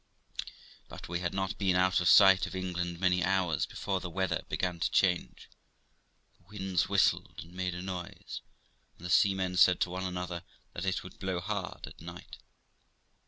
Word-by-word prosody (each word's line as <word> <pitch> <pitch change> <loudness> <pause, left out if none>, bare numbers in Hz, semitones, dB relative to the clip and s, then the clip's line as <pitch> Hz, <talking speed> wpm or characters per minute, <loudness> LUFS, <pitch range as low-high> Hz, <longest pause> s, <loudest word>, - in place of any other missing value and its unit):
But - - -9
we 85 0 -2
had 85 -1 -2
not 95 +1 -3
been 95 -2 +2
out 90 0 +3
of 85 - +3
sight 95 -2 +7
of - - -8
England 90 -2 -3
many 90 -1 +2
hours 90 -5 +1
before 95 -2 -2
the 90 - -6
weather 95 +1 -1
began 90 -2 -1
to - - +1
change; 90 -3 +1 0.9
the - - -30
winds 95 -4 -1
whistled - - +2
and 85 +2 -17
made 90 -1 -2
a 90 - -5
noise, 90 -2 -6 0.6
and 90 - -11
the 90 - -3
seamen 95 -1 +3
said 90 0 +6
to 90 - +1
one 95 +1 -3
another 90 -1 -4 0.3
that 85 - -4
it 95 - 0
would 90 - -12
blow 95 -2 -2
hard 95 +1 -4
at - - -13
night. - - -10
90 Hz, 175 wpm, -31 LUFS, 90-95 Hz, 0.9 s, sight